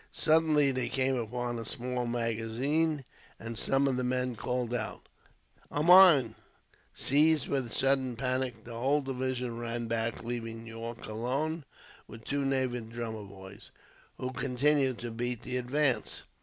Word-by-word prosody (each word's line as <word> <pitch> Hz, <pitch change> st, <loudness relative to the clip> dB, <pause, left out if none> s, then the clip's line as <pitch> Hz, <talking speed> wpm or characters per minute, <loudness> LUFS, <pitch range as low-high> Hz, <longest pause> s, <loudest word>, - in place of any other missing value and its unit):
Suddenly 155 Hz, -3 st, +3 dB
they 130 Hz, -1 st, -1 dB
came 130 Hz, 0 st, +1 dB
upon 120 Hz, 0 st, -3 dB
a -, -, -4 dB
small 125 Hz, +1 st, -3 dB
magazine, 120 Hz, +6 st, 0 dB, 0.3 s
and 115 Hz, +1 st, -6 dB
some 135 Hz, +5 st, +2 dB
of 130 Hz, -2 st, 0 dB
the 125 Hz, -, -1 dB
men 125 Hz, 0 st, -1 dB
called 125 Hz, +1 st, -2 dB
out, 120 Hz, -3 st, -4 dB, 0.6 s
"A 145 Hz, -, -1 dB
mine!" 170 Hz, -9 st, +8 dB, 0.6 s
Seized 150 Hz, +1 st, +3 dB
with 135 Hz, -3 st, -1 dB
a -, -, -11 dB
sudden 130 Hz, +1 st, +1 dB
panic, 125 Hz, -2 st, -2 dB
the 120 Hz, -, -9 dB
whole 135 Hz, +6 st, +1 dB
division 130 Hz, -3 st, -3 dB
ran 120 Hz, 0 st, -3 dB
back, 115 Hz, 0 st, -2 dB
leaving 115 Hz, -1 st, -5 dB
Yorke 115 Hz, +1 st, -7 dB
alone 135 Hz, +8 st, -2 dB, 0.4 s
with 110 Hz, +1 st, -11 dB
two 140 Hz, 0 st, -1 dB
native 130 Hz, -4 st, -1 dB
drummer 115 Hz, -2 st, -5 dB
boys, 95 Hz, 0 st, -12 dB, 0.5 s
who 130 Hz, -, -4 dB
continued 135 Hz, 0 st, +1 dB
to 120 Hz, 0 st, -6 dB
beat 120 Hz, 0 st, -3 dB
the 125 Hz, 0 st, -2 dB
advance. 130 Hz, +2 st, 0 dB
125 Hz, 145 wpm, -30 LUFS, 115-135 Hz, 0.6 s, mine